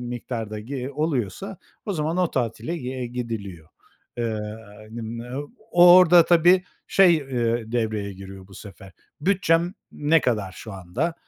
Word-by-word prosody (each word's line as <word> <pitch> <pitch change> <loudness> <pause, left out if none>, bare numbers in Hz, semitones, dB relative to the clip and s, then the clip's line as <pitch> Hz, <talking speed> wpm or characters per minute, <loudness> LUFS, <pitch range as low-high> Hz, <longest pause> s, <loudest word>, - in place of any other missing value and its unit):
miktarda, 120 -3 -5
gi 130 +3 -5
oluyorsa 150 - -2 0.3
o 205 - -1
zaman 160 0 -2
o 180 -2 +1
tatile, 125 +6 -2
eee, 130 -3 -5
gidiliyor. 110 -9 -6 0.5
Eee, 115 -2 -1 0.5
n 115 +1 -7
m 115 +3 -6 0.3
o 175 -1 +8
orada, 175 -2 +7
tabii, 175 +2 +4 0.2
şey, 185 -3 +5
eee, 120 -5 -2
devreye 110 -4 -2
giriyor, 95 0 -11
bu 100 - -16
sefer, 95 -1 -12 0.3
"Bütçem 175 0 +1 0.2
ne 155 +2 +2
kadar 105 -6 -1
şu 110 +3 -10
anda?" 95 - -3
125 Hz, 140 wpm, -24 LUFS, 110-165 Hz, 0.5 s, o